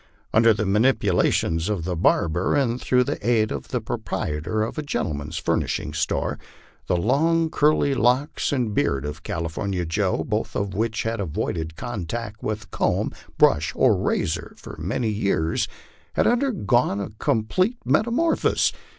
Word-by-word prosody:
Under 115 +1 +6
the 105 0 0
manipulations 100 -6 +2
of 100 -6 -1
the 90 +1 -2
barber, 85 - +2
and 125 -4 +1
through 125 0 +3
the 120 - -4
aid 110 -1 +2
of 70 -2 -5
the - - -1
proprietor 80 +8 -2
of 115 - -4
a - - 0
gentleman's 75 - -3
furnishing 75 -4 -1
store, 80 +1 -1 0.5
the 90 - +2
long, 160 - +2
curly 150 -1 +3
locks 130 +5 +1
and 125 -6 0
beard 70 - 0
of 75 +2 -5
California 85 +3 -3
Joe, 95 +4 0
both 110 0 -2
of 100 -1 -2
which 110 +2 -1
had 115 0 -2
avoided 80 -2 -3
contact 110 0 -5
with 105 -2 -4
comb, - - 0 0.3
brush, 80 +6 +3
or 125 -5 +4
razor 95 -2 -1
for - - -10
many 110 +8 -1
years, 100 -6 0 0.5
had - - +2
undergone 185 - +2
a 100 - -4
complete 185 - +1
metamorphosis. 240 +9 +2
105 Hz, 145 wpm, -24 LUFS, 85-125 Hz, 0.5 s, Under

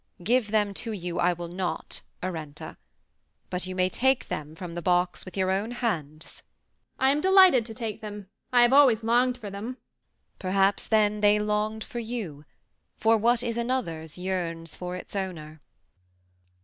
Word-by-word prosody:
"Give 235 +1 +2
them 205 -2 +1
to 225 -2 -4
you, 175 -3 -4
I 180 +1 +3
will 175 0 -6
not, 180 +1 -4 0.2
Arenta; 160 -5 -6 0.7
but 180 0 -2
you 185 - -5
may 185 0 +2
take 265 +6 +1
them 150 +1 -5
from 175 0 -7
the 175 - -4
box 180 +1 +1
with 185 0 -10
your 190 0 +1
own 200 +4 -1
hands." 165 - -4 0.6
"I 265 +1 +4
am 290 +2 +1
delighted 375 - +6
to 225 - -9
take 225 -2 -5
them. 205 -2 -7 0.2
I 245 -1 +6
have 240 +2 +4
always 260 -6 +6
longed 245 +2 +2
for 210 -5 -8
them." 220 +6 -6 0.6
"Perhaps 195 +1 +2
then 210 -1 +2
they 205 0 +5
longed 210 +1 -1
for 240 - -6
you, 215 -11 -5 0.5
for 225 0 +4
what 235 +2 +2
is 235 -1 -2
another's 180 - -3
yearns 170 -3 -3
for 180 0 -5
its 185 - -9
owner." 160 -6 -5
205 Hz, 165 wpm, -27 LUFS, 180-235 Hz, 0.7 s, delighted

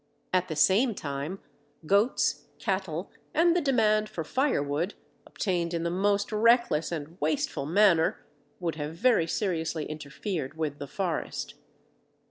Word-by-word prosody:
At 185 0 +2
the 155 - -4
same 210 - +4
time 145 +5 -4 0.5
goats, 200 +8 +2
cattle, 190 -4 -2 0.2
and 340 +2 +4
the 355 - +3
demand 215 -6 +2
for 165 - -4
firewood, 170 - 0 0.3
obtained 175 -4 -1
in 165 - -1
the 170 - -1
most 200 +3 +1
reckless 225 -7 +3
and 165 +1 -6
wasteful 145 -2 -1
manner, 170 -2 +3 0.3
would 170 -3 -1
have 150 +1 -4
very 225 -4 +3
seriously 165 -5 -1
interfered 150 0 -5
with 150 -3 -2
the 140 - -5
forest. 170 +2 -3
175 Hz, 130 wpm, -28 LUFS, 155-210 Hz, 0.5 s, same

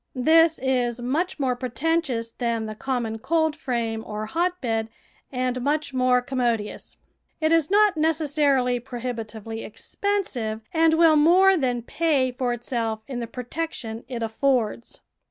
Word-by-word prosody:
This 320 +5 +5
is 250 -2 0
much 300 +9 -1
more 260 -3 +1
preten 270 +7 0
tious 230 -7 -4
than 230 -2 -1
the 215 - -5
common 230 -1 -3
coldframe 255 -8 -1
or 215 0 -5
hotbed 245 -7 -1 0.4
and 255 -1 -1
much 290 +1 -1
more 255 -1 +3
commodious. 240 -5 -2 0.4
It 315 0 +1
is 330 -3 +3
not 415 -1 +4
necessarily 290 -5 +1
pro 245 0 -8
hibitively 225 -2 -5
expensive, 245 - -3
and 320 -1 +4
will 325 -1 +5
more 370 +5 +6
than 250 -7 -1
pay 280 -2 +1
for 250 0 -2
itself 230 -2 -3
in 260 -3 -4
the 235 - -4
protection 245 -2 -5
it 240 -3 -4
affords. 235 0 -1
255 Hz, 135 wpm, -24 LUFS, 230-315 Hz, 0.4 s, more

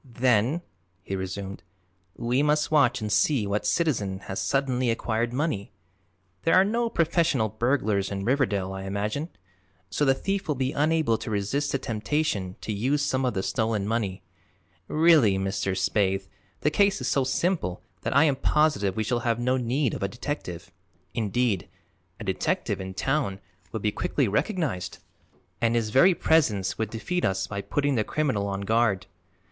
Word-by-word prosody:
"Then," 125 +4 +1 0.4
he 95 - -4
resumed, 95 +1 -5 0.5
"we 120 +3 0
must 150 +1 +2
watch 130 -5 +3
and 105 -1 -3
see 110 +2 +3
what 105 +1 -1
citizen 105 - 0
has 95 0 -5
suddenly 130 -3 +1
acquired 115 0 0
money. 130 -6 -2 0.7
There 165 - +3
are 185 - +7
no 230 +3 0
professional 165 - +1
burglars 110 -4 0
in 100 -1 -4
Riverdale, 105 -8 +1
I 95 0 -6
imagine, 105 - -2 0.6
so 145 - 0
the 135 -2 +4
thief 195 +6 -2
will 150 - 0
be 130 0 -1
unable 150 -6 +2
to - - -6
resist 110 +8 -1
the - - +1
temptation 110 -5 -2
to 110 - -3
use 135 +8 0
some 135 -2 0
of 125 - -1
the 95 - -1
stolen 110 -4 0
money. 100 -5 -2 0.6
Really, 155 - +5
Mr. 95 0 -1
Spaythe, 95 0 +1 0.3
the 150 - +2
case 200 +3 +3
is 130 - -3
so 135 +1 +2
simple 135 - -1 0.2
that - - -2
I - - +7
am 145 -4 +2
positive 130 -14 +2
we 110 - 0
shall 120 +3 0
have 115 -1 0
no 125 +2 +1
need 125 +1 0
of - - -5
a 100 - +1
detective. 95 - -5 0.4
Indeed, 110 -2 0 0.5
a - - -6
detective - - -1
in 95 0 -6
town 130 -3 0 0.3
would 110 - -4
be 105 - +2
quickly 135 +4 0
recognized 140 - -1 0.6
and 115 0 +2
his 110 -2 0
very 170 - +6
presence 110 - +2
would 110 -2 -1
defeat 115 +12 -3
us 95 0 +1
by 100 -1 -4
putting 145 +7 0
the 115 -4 +1
criminal 120 -8 -1
on 100 0 -3
guard. 105 -2 +1
115 Hz, 165 wpm, -26 LUFS, 100-145 Hz, 0.7 s, are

